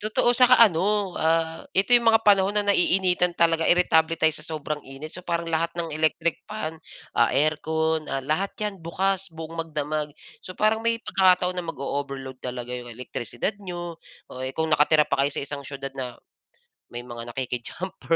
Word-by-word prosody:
Totoo, 220 +3 +2
'saka 250 0 +7
ano, 200 +1 +1
ah, 165 0 +1 0.2
ito 195 +5 +3
yung 235 -1 +3
mga 225 - +4
panahon 200 -1 +4
na 205 - +2
naiinitan 180 -1 +2
talaga 165 -1 +2
iritable 165 -2 +3
tayo 160 0 +3
sa 150 0 -7
sobrang 150 -1 -4
init 155 +4 -8
so 180 0 -7
parang 170 0 -1
lahat 165 +1 0
ng 170 -1 -2
electric 160 +1 +1
fan, 210 -7 -4 0.5
ah, 120 - +5
aircon, 160 +2 +1
ah, 135 0 -2
lahat 170 +7 0
'yan 210 -1 -2
bukas, 190 +3 -1
buong 160 0 -8
magdamag. 150 -1 -3 0.4
So, 185 - -7
parang 215 +1 +2
may 230 0 +2
pagkakataon 185 -1 +3
na 180 - -3
mag-o-overload 140 -3 -4
talaga 125 -1 -5
yung 120 -1 -8
elektrisidad 120 - -4
niyo. 175 -3 -6 0.4
Oh, 130 - -8
eh, 130 +1 -3
kung 160 0 0
nakatira 150 +1 +5
pa 140 - 0
kayo 140 +1 +2
sa - - -1
isang 140 0 -6
siyudad 135 -1 -6
na, 125 -3 -6 0.8
may 120 - -5
mga 120 -1 -8
nakiki-jumper 135 +9 -3
160 Hz, 175 wpm, -25 LUFS, 145-185 Hz, 0.8 s, saka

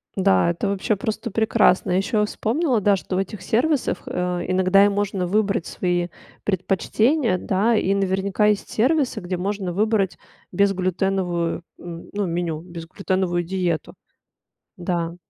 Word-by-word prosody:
Да, 190 -3 +3
это 175 +4 -1
вообще 200 +2 0
просто 220 +4 -3
прекрасно. 220 -4 +3
Ещё 195 +4 +1
я - - +3
вспомнила, 245 +3 0
да, 205 0 +4
что 185 0 -4
в - - +1
этих 195 0 -4
сервисах, 255 +8 0
э, 180 -1 -2
иногда 185 +2 +4
и - - +4
можно 200 -2 -1
выбрать 200 -1 +1
свои 175 -1 -1 0.4
предпочтения, 210 - +1
да. 205 +6 +1
И 195 -2 +2
наверняка 195 +1 +1
есть 210 -1 0
сервисы, 270 +4 +1
где 180 0 -3
можно 195 0 -2
выбрать 205 0 +1 0.3
безглютеновую, 185 -2 0 0.2
м, 170 -1 -9
ну, 205 -1 -1
меню. 170 -2 -2
Безглютеновую 175 +1 -2
диету. 175 -2 -2 0.8
Да. 175 -1 -2
190 Hz, 135 wpm, -22 LUFS, 180-210 Hz, 0.8 s, да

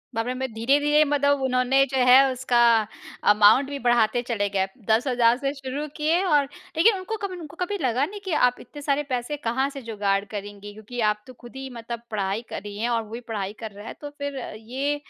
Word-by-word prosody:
बाप 225 +1 0
रे! 250 - -1
मैं 260 -1 -4
धीरे-धीरे 290 +6 +3
मतलब 285 -1 +2
उन्होंने 260 +1 +3
जो 265 - 0
है 250 +1 +9
उसका 255 -1 0 0.7
अमाउंट 215 +7 +5
भी 280 -1 -4
बढ़ाते 240 0 +3
चले 205 -4 0
गए, 195 -1 0 0.2
10 225 +5 +3
हज़ार 240 -1 +3
से 275 0 -2
शुरू 275 +2 -5
किए 320 +4 +1
और 295 -6 +3 0.3
ठीक 325 - +1
है 455 - +6
उनको 440 +4 -4
कभी 375 -2 -3
उनको 320 -1 -10
कभी 400 +3 -1
लगा 255 +2 +1
नहीं 410 +4 -8
कि 375 - -3 0.2
आप 245 - -14
इतने 290 +4 -11
सारे 285 0 0
पैसे 250 +4 -2
कहाँ 265 +2 -1
से 275 -1 -8
जुगाड़ 205 -3 -1
करेंगी। 205 0 -8
क्योंकि 220 +3 -9
आप 210 0 -7
तो 255 - -11
खुद 240 +1 -15
ही 265 0 -6
मतलब 235 -1 -7
पढ़ाई 200 +1 -1
कर - - -5
रही 205 0 -8
हैं 230 +3 -1
और 230 -1 +1
वो 215 - -15
भी 235 - -4
पढ़ाई 200 -1 -3
कर 220 -2 -6
रहा 205 +2 -11
है। - - -6
तो 290 - -6
फ़िर 285 -1 -6 0.2
ये 265 +6 -2
255 Hz, 225 wpm, -24 LUFS, 225-285 Hz, 0.7 s, है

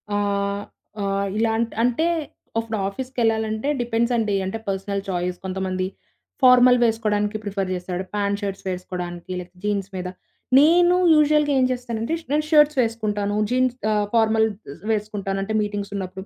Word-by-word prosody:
ఆహ్, 200 0 -1 0.4
ఆహ్, 200 0 0
ఇలాంట్ 225 +1 +1
అంటే, 245 +7 +2 0.5
అఫ్ఫుడు 225 -1 -3
ఆఫీస్‌కెళ్ళాలంటే 225 0 -1
డిపెండ్సండి. 235 -3 +1
అంటే, 190 +4 -3
పర్సనల్ 195 +1 -2
ఛాయిస్. 180 0 -2
కొంతమంది 185 0 -2 0.6
ఫార్మల్ 250 0 +7
వేసుకోడానికి 215 -2 0
ప్రిఫర్ 195 -2 -2
జేస్తాడు. 180 0 -4
ప్యాంట్, 200 0 0
షర్ట్స్ 195 -1 -5
వేసుకోడానికీ, 180 -1 -5
లైక్ 180 0 -10
జీన్స్ 200 -2 -1
మీద. 180 0 -4 0.5
నేను 350 +4 +5 0.2
యూజువల్‌గా 300 -1 +3
ఏం 255 - +4
చేస్తానంటే, 240 +1 -3
ష్ - - -25
నేను 305 0 +1
షర్ట్స్ 300 -1 +5
వేసుకుంటాను. 210 -3 -1
జీన్స్ 255 0 +2 0.2
ఆహ్, 210 -1 +1
ఫార్మల్స్ 220 -2 +3 0.3
వేసుకుంటాను. 205 -2 -2
అంటే, 220 +2 -3
మీటింగ్సున్నప్పుడు. 200 -2 -5
210 Hz, 130 wpm, -23 LUFS, 195-235 Hz, 0.6 s, ఫార్మల్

